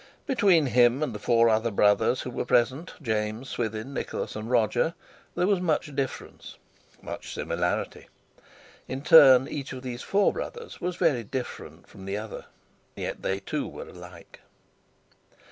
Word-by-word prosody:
Between 195 - +3
him 125 +2 +3
and 145 - -2
the 105 - -6
four 115 +1 +3
other 110 +1 +2
brothers 105 +3 +3
who 125 - -6
were - - -3
present, 130 +7 +1
James, 110 +2 -2
Swithin, 110 +3 -4
Nicholas, - - -4
and 110 +2 -6
Roger, 120 +6 +1 0.4
there 180 - +1
was 195 -2 +2
much 155 -4 -1
difference, 135 -2 -5 0.5
much - - -7
similarity. - - -2 0.8
In 135 +2 -5
turn, 135 -5 +8
each 140 -2 -5
of 130 0 -8
these 125 -1 -5
four 200 +1 +2
brothers 470 -1 -7
was 180 0 -2
very 155 -10 +1
different 125 +4 -7
from 95 - -13
the 95 +1 -3
other, 110 0 -7 0.5
yet - - -5
they, 95 +1 -2
too, - - -3
were - - -9
alike. 90 -1 -13
125 Hz, 150 wpm, -26 LUFS, 110-150 Hz, 0.8 s, turn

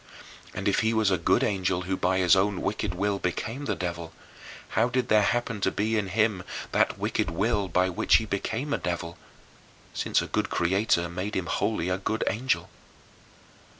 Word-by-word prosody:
And 95 +1 -3
if 100 - +3
he 110 +1 +1
was 110 -3 +3
a 95 - +1
good 85 - +2
angel 95 -2 0
who 95 +1 -1
by 95 +1 +1
his 90 +1 +5
own 95 0 +1
wicked 105 -3 -2
will 100 +2 0
became 115 +10 -3
the - - -1
devil, 85 -2 -5 0.6
how 115 +3 +2
did 125 +1 -1
there 110 -1 +5
happen 115 0 0
to 95 - +3
be 110 +3 -1
in 105 -3 0
him 105 0 +1 0.3
that - - +2
wicked - - -1
will 100 +4 0
by 90 +1 +2
which 90 - +2
he 110 - +3
became 110 +7 -2
a - - 0
devil, 85 -1 -3 0.8
since - - +1
a - - -2
good - - -1
Creator 85 -1 +1
made 90 +5 -4
him 95 - -1
wholly 90 0 -1
a 90 +1 -1
good 110 +3 -1
angel? 130 +4 0
100 Hz, 185 wpm, -27 LUFS, 90-110 Hz, 0.8 s, his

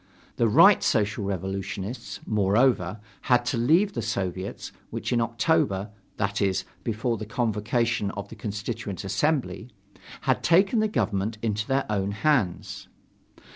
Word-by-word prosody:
The 115 - +3
Right 105 - +7
Social 105 -1 +1
Revolutionists, 95 +3 -4
moreover, 105 -1 +2 0.3
had 120 -1 +4
to 125 0 -1
leave 165 - +3
the 120 - -2
Soviets, 95 -3 -4 0.2
which - - -3
in 120 - +2
October 115 -4 +1 0.3
that 100 +1 -1
is, 95 -2 +1 0.2
before 115 +1 -1
the 110 - -6
convocation 115 -1 0
of 100 - -5
the - - -9
Constituent 105 -2 -5
Assembly 125 - -1 0.5
had - - +1
taken 195 +7 +4
the 215 - +2
government 110 - -1
into 110 -1 -1
their 135 +1 +1
own 100 -1 -1
hands. 110 - 0
110 Hz, 135 wpm, -26 LUFS, 100-120 Hz, 0.5 s, Right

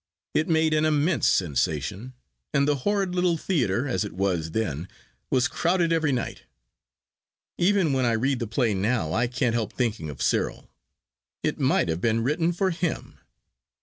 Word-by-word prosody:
It 155 - +1
made 160 -1 +3
an 155 0 +2
immense 155 +2 +2
sensation, 80 - 0 0.4
and 140 0 +3
the 145 -1 +2
horrid 195 +5 0
little 180 -2 +2
theatre, 135 - 0
as 95 -9 0
it - - -6
was 90 -3 -1
then, 85 -5 -2 0.4
was 125 -1 +2
crowded 170 -1 +1
every 160 -3 +2
night. 125 -3 -3 1.2
Even 185 -4 +3
when 130 -1 +1
I 120 -2 +2
read 130 +3 0
the 115 - -3
play 115 0 +1
now 100 -4 0
I 120 +2 +1
can't 125 -1 0
help 115 -3 -2
thinking 110 -11 -2
of 70 - -8
Cyril. - - -1 0.8
It - - -1
might - - +2
have 80 +1 -2
been 115 +1 +1
written 165 +6 +1
for 185 +2 0
him. 165 -1 -3
125 Hz, 165 wpm, -25 LUFS, 105-160 Hz, 1.2 s, made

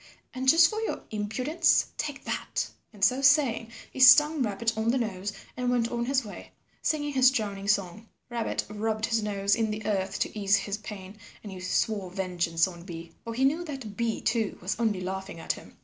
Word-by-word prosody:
And 260 +1 +1
just 330 +3 +7
for 435 +4 -3
your 445 - -3
impudence, 225 +10 +1
take 290 -3 -4
that." - - -2 0.2
And 205 -3 -9
so 255 +3 +2
saying 275 -5 +3 0.2
he - - -8
stung 295 +4 +7
Rabbit 225 0 0
on 220 +1 0
the 255 - +2
nose 205 -4 -3 0.2
and 250 0 -1
went 240 -2 +1
on 235 0 -1
his 265 -1 +1
way, 205 - -10 0.3
singing 295 -2 -1
his 260 -1 +6
droning 205 -6 -3
song. 205 +1 -1 0.2
Rabbit 235 -2 -2
rubbed 215 +1 -2
his 230 -1 0
nose 200 -1 +1
in 225 -2 0
the 215 0 -5
earth 195 -2 -1
to - - -1
ease 195 -1 +4
his 200 +1 -2
pain 205 -1 -9 0.2
and 205 - -8
he 185 - -8
swore 190 +1 -1
vengeance 175 -3 0
on 175 -2 -9
Bee, 170 -2 -9
for 230 -1 -6
he 265 +3 +2
knew 310 +6 +1
that 265 -9 -7
Bee 230 0 -1
too 220 -2 0
was 185 +3 -2
only 215 -5 0
laughing 190 -1 -5
at - - -1
him. - - -14
220 Hz, 200 wpm, -28 LUFS, 195-255 Hz, 0.3 s, just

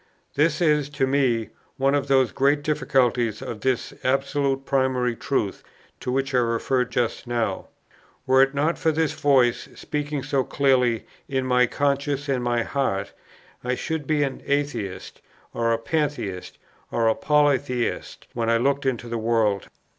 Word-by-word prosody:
This 155 +3 +1
is, 150 -3 +2
to 135 - +3
me, 130 -5 +1 0.3
one 135 +1 +2
of 140 -1 0
those 130 -2 +3
great 145 +2 +2
difficulties 125 -7 +1
of 110 -3 -6
this 130 -1 -1
absolute 135 +1 0
primary 130 -3 +1
truth, 105 -6 -2 0.4
to 125 - -3
which 135 +1 -1
I 125 - +4
referred 125 +2 0
just 120 0 -1
now. 115 -5 -2 0.6
Were 130 0 +5
it 135 +1 +2
not 155 +4 0
for 160 - +2
this 160 0 0
voice, 130 -4 +2
speaking 145 -2 -3
so 135 -2 0
clearly 125 -5 +2 0.2
in 135 -1 -1
my 125 -1 +3
conscience 140 +1 -1
and 130 -3 0
my 120 -1 +1
heart, 120 -9 -2 0.5
I 125 +1 0
should 160 +1 -4
be 150 -2 +2
an 135 -2 -3
atheist, 140 -9 -2 0.3
or 115 0 0
a 115 - +2
pantheist, 135 - -3 0.3
or 115 -1 +1
a 110 - +4
polytheist 140 -4 0
when 115 -1 -1
I 115 - +4
looked 140 +3 +1
into 120 -2 -2
the 115 0 -3
world. 110 -3 +1
130 Hz, 155 wpm, -24 LUFS, 120-140 Hz, 0.6 s, Were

